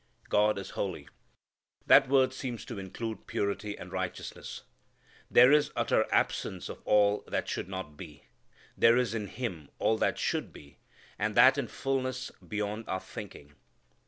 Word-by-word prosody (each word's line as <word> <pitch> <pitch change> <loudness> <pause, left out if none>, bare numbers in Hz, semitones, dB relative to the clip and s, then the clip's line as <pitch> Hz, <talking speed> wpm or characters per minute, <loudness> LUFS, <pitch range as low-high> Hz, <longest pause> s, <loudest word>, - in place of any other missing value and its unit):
God 105 0 +3
is 100 - -6
holy. 85 -7 -4 0.8
That 135 -2 +7
word 130 -1 +4
seems 130 -3 -5
to 115 -5 -6
include 110 +4 -6
purity 100 +1 -2
and - - -10
righteousness. - - -5 0.7
There 125 +2 +7
is 150 0 +4
utter - - +1
absence - - 0
of - - -8
all 105 0 +3
that - - -2
should - - -3
not 95 -6 -6
be. 75 -6 -11 0.5
There 115 +1 +5
is 125 -3 +1
in 105 -3 -3
Him 95 - -5
all 110 - +1
that - - +1
should - - -1
be, 70 -1 -15 0.4
and 110 0 -1
that 130 +2 +7
in 130 - -2
fulness 130 0 -2
beyond 105 +1 -4
our 95 - -1
thinking. 70 -5 -10
110 Hz, 155 wpm, -30 LUFS, 100-125 Hz, 0.8 s, That